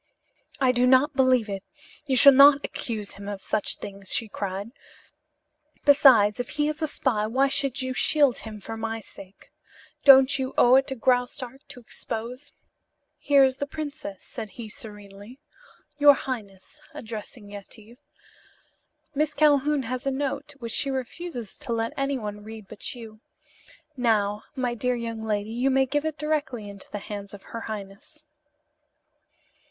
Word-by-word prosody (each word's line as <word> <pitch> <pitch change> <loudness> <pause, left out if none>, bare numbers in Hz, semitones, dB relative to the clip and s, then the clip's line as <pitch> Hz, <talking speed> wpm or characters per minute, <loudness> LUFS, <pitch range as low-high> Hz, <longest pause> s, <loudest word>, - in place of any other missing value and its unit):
"I 260 -2 +4
do 250 0 +2
not 265 +3 +4
believe 255 -4 +3
it. 195 -1 -4 0.5
You 265 - +1
shall 280 +2 +9
not 280 +1 +7
accuse 215 -4 -4
him 200 0 -10
of 200 -2 -6
such 215 - +1
things," 195 -1 -8
she 225 - +1
cried. 200 +1 -5 1.1
"Besides, 255 -7 +6
if 245 - -3
he 295 0 +2
is 305 +1 -3
a 315 - +1
spy 220 -7 0
why 265 +5 +2
should 275 -1 -1
you 260 0 -3
shield 280 0 +3
him 215 -1 -8
for 225 +3 -7
my 225 0 -4
sake? 195 -2 -14 0.5
Don't 270 0 +7
you 260 0 -3
owe 245 - +6
it 270 - +2
to 265 - -3
Graustark 250 +1 -1
to - - -10
expose 240 +3 -6 0.4
" - - -52
"Here 280 -1 +6
is 260 0 +2
the 285 - -3
princess," 290 -10 -7
said 215 - -7
he 230 -3 -7
serenely. 210 +2 -9 0.6
"Your 290 -1 +8
highness," 225 0 -7
addressing 220 -4 -8
Yetive, 215 +4 -11 1.1
"Miss 300 +1 0
Calhoun 290 -1 +3
has 255 +3 -4
a - - +4
note 280 +1 -3
which 235 -4 -5
she 275 - +1
refuses 260 - -5
to 235 - -3
let 230 0 -2
anyone 235 -7 -3
read 220 -1 -10
but 215 +5 -7
you. 220 -3 -11 0.8
Now, 215 -4 0
my 250 -2 -1
dear 250 +2 -1
young 230 -1 -5
lady, 215 -1 -2
you 245 +4 0
may 265 0 +3
give 290 +3 -1
it 315 -1 -3
directly 290 -8 -2
into 200 -1 -10
the - - -4
hands 200 0 -7
of 195 - -14
her 230 - -7
highness." 210 +9 -9
245 Hz, 160 wpm, -25 LUFS, 215-275 Hz, 1.1 s, shall